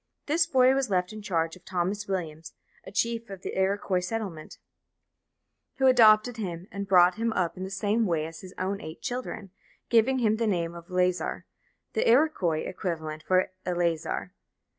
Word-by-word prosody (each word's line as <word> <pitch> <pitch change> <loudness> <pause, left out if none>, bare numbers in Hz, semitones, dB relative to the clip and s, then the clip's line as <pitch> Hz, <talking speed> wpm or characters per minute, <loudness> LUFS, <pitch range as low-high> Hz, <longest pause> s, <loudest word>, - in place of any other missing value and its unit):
This 330 +3 +2
boy 260 -4 +5
was 270 -3 0
left 180 +1 0
in 215 - -8
charge 165 -4 -1
of 180 - -18
Thomas 190 +3 -2
Williams, 165 -5 -4 0.3
a - - -8
chief 230 +1 -1
of 195 -2 -9
the - - -5
Iroquois 190 -1 +1
settlement, 185 -4 -5 1.2
who 265 - +1
adopted 235 -2 +6
him 180 -5 -5
and 200 0 -5
brought 180 0 +5
him 230 0 +1
up 175 -5 0
in 185 - -6
the 190 - -4
same 205 +3 0
way 160 -3 0
as 160 0 -9
his 185 0 -11
own 195 +2 -2
eight 155 +1 -9
children, 245 -6 -5 0.4
giving 240 +3 +4
him 220 -3 +2
the 230 0 0
name 170 -4 -1
of 170 0 -11
Lazar, 180 0 0 0.5
the - - +1
Iroquois 230 - +3
equivalent 160 -4 -4
for 185 +3 +1
Eleazar. 175 0 -1
190 Hz, 170 wpm, -27 LUFS, 175-225 Hz, 1.2 s, adopted